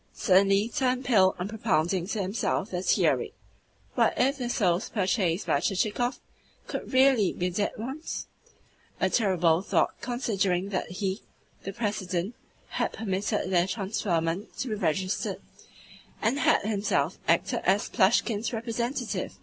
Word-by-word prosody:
suddenly 195 +1 +3
turned 255 +1 0
pale 195 -7 +4
on 180 - -3
propounding 185 -5 0
to 215 - -2
himself 195 +1 -1
the 180 -1 -2
theory. 430 - +2 0.6
"What - - +2
if 270 +2 +2
the 245 -1 -2
souls 185 -5 +1
purchased 190 -3 0
by - - +2
Chichikov 225 +5 0 0.5
should - - -5
REALLY 260 -6 +4
be 180 +1 -2
dead 205 +3 -1
ones?" 265 +8 -5 0.7
a - - +1
terrible 180 -6 +3
thought - - +1
considering 200 -7 -1
that 190 -2 -2
he, 190 +2 -3 0.4
the 195 - -5
President, 200 -2 -2 0.4
had - - -1
permitted 205 -1 -2
their 175 0 +3
transferment 190 -3 -2
to 255 - -3
be - - -1
registered, 190 -1 -1 0.8
and 235 +6 +1
had - - +3
himself 200 -7 0
acted 170 - +2
as 195 +3 +2
Plushkin's 215 +2 +2
representative! 235 - -3
200 Hz, 135 wpm, -27 LUFS, 185-230 Hz, 0.8 s, pale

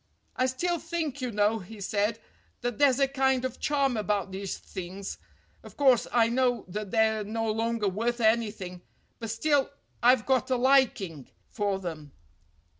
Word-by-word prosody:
"I 255 - +2
still 340 +7 -1
think, 310 -6 -3
you 250 - -1
know," 210 0 +1
he 210 +3 -11
said, 205 +2 0 0.4
"that 245 0 -3
there's 275 -3 +5
a 275 - +4
kind 265 -1 +1
of 255 -1 -4
charm 280 -4 +1
about 205 -2 -1
these 195 0 -4
things. 190 +2 -7 0.4
Of - - -14
course, 265 -4 +4
I 230 -2 +4
know 245 -1 +1
that 210 +2 -4
they're 220 0 +2
no 225 +1 -2
longer 225 -1 0
worth 230 +5 -1
anything, 215 -5 0 0.4
but 225 -2 -5
still 275 +5 +1 0.3
I've 245 -2 +5
got 265 -1 +1
a 260 - +2
liking 240 - +2 0.2
for 205 -2 -1
them." 160 -6 -7
225 Hz, 160 wpm, -28 LUFS, 205-260 Hz, 0.4 s, there's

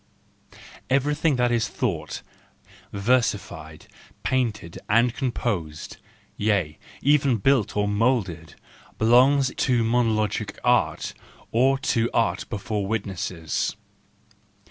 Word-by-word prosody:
—Everything 145 +3 +2
that 125 -1 +1
is 115 -2 +1
thought, - - -3 0.7
versi¬ 120 +3 +2
fied, 80 +1 -11 0.4
painted 105 -6 -1
and 115 +3 +3
composed, 90 - -3 0.4
yea, 100 -8 0 0.2
even 140 -3 +3
built 120 0 +2
and 105 0 0
moulded, 100 - 0 0.4
belongs 130 +4 +4
either - - -17
to 120 -3 +2
monologic 115 -2 0
art, - - +1 0.4
or 130 +4 +3
to 115 -3 0
art 100 -3 0
before 105 -1 -3
witnesses. 95 -7 -2
115 Hz, 100 wpm, -24 LUFS, 100-125 Hz, 0.7 s, belongs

